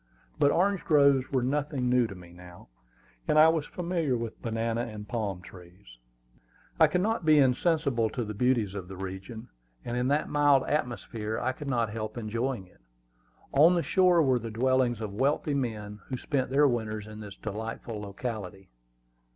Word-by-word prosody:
But 140 - +5
orange 190 +4 +1
groves 140 -4 +4
were 130 -3 +1
nothing 140 -1 -1
new 125 -1 +3
to 100 - -9
me 90 -1 -13
now, 90 -5 -14 0.6
and - - +2
I 155 +1 +8
was 160 -2 0
familiar 170 -7 -1
with 115 -1 -6
banana 115 0 -1
and 105 -3 -7
palm 100 -6 -3
trees. 90 -7 -15 0.8
I - - +7
could 180 - 0
not 220 -1 0
be 155 -1 +5
insensible 135 -3 +2
to 120 0 -3
the 105 - -5
beauties 115 -3 +1
of 95 -3 -6
the 95 - -8
region, 95 +5 -7 0.4
and 120 - -3
in 125 +1 0
that 145 +2 +1
mild 145 -2 +4
atmosphere 115 -6 -3
I 130 - 0
could 140 +3 -8
not 115 -4 0
help 110 +1 -5
enjoying 115 0 -3
it. 90 - -25 0.7
On 160 +6 +6
the 170 - +1
shore 180 -3 +4
were 130 -3 +2
the 115 0 -6
dwellings 125 0 +1
of 105 -2 -5
wealthy 140 +6 0
men 105 -6 -3
who 130 - -4
spent 130 +1 -2
their 145 +2 +4
winters 110 -4 -2
in 110 0 -10
this 105 -2 -9
delightful 110 +1 -6
locality. 100 - -6
120 Hz, 175 wpm, -28 LUFS, 105-140 Hz, 0.8 s, I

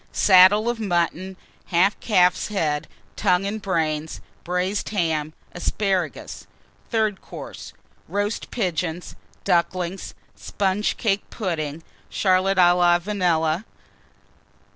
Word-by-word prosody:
Saddle 195 +3 +6
of 240 -1 -1
Mutton. 185 -1 -1 0.3
Half 185 +4 +2
Calf's 180 -5 +2
Head, 155 -8 -1 0.3
Tongue, 180 +2 +2
and 210 +2 -3
Brains. 160 -5 -2 0.2
Braised 180 +3 -2
Ham. 160 -6 -1 0.2
Asparagus. 185 -1 -2 0.4
THIRD 215 -4 0
COURSE. - - -9 0.4
Roast 205 +2 -2
Pigeons. 180 -5 -3 0.3
Ducklings. 180 +1 -1 0.2
Sponge 200 +1 -1
cake 205 -4 -1
Pudding. 165 -6 -4 0.3
Charlotte 190 0 +2
à 175 -1 +6
la 175 -1 +4
Vanille. 175 -3 0
185 Hz, 100 wpm, -23 LUFS, 170-200 Hz, 0.4 s, Saddle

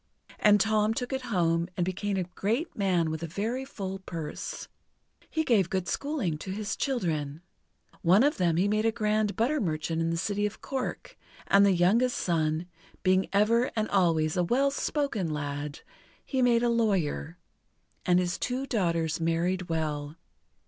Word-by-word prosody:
And 210 -1 +5
Tom 215 +1 +2
took 250 +2 -3
it 265 - -1
home, 170 -4 +1
and 175 - +1
became 195 +2 -2
a 185 - +1
great 220 - -2
man 180 -5 +1
with 160 0 -4
a 165 - -3
very 220 +10 -2
full 195 -8 -5
purse. 165 -5 -6 0.6
He 315 - 0
gave 210 - +3
good 185 -2 -1
schooling 260 - -2
to 190 - -7
his 205 +1 -3
children. 160 - -2 0.6
One 185 +7 +5
of 290 +2 +2
them 170 -3 +2
he 190 +3 +3
made 215 +1 +1
a 225 - +4
grand 215 -1 0
butter 265 +6 +1
merchant 160 -1 -1
in 165 - 0
the 165 - -1
city 205 +4 0
of 210 - -9
Cork, 265 -2 -5 0.3
and 200 0 +5
the 200 - +5
youngest 205 +8 +3
son 160 -1 0 0.4
being 185 +1 +3
ever 230 +5 +3
and 215 -1 0
always 165 -5 +2
a 180 - +2
well 265 +9 +2
spoken 275 - -1
lad 145 0 -4 0.4
he 265 -2 -1
made 240 -1 +4
a 240 - +3
lawyer; 190 -8 0 0.7
and 180 -1 +3
his 180 -1 0
two 255 +2 -2
daughters 170 - 0
married 170 +2 0
well. 150 -2 -2
190 Hz, 170 wpm, -28 LUFS, 165-225 Hz, 0.7 s, And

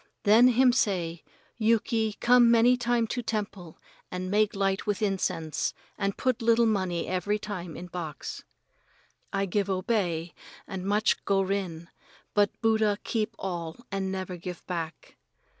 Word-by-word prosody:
Then 220 +4 +7
him 250 0 +5
say, 175 -9 0 0.4
'Yuki, 225 0 +2
come 240 -1 +6
many 235 +2 +5
time 240 -1 +1
to 245 +2 -3
temple 200 -7 -4 0.3
and 185 0 -4
make 210 0 +2
light 195 0 0
with 205 -2 0
incense 180 -6 -1 0.2
and 200 -1 -2
put 255 -1 0
little 230 0 +4
money 185 -6 0
every 185 +3 0
time 180 -6 -6
in 175 - -7
box.' 170 -4 -6 0.9
I 195 0 0
give 200 +1 -1
obey 185 -4 -1 0.3
and 190 -1 -5
much 210 +2 +2
go 195 -1 +2
rin, 185 -4 -3 0.5
but 205 -1 +4
Buddha 220 -2 +3
keep 225 0 -2
all 170 -4 -4
and 195 -1 -2
never 185 -1 -4
give 175 0 -7
back." 165 -3 -6
200 Hz, 140 wpm, -28 LUFS, 180-225 Hz, 0.9 s, Then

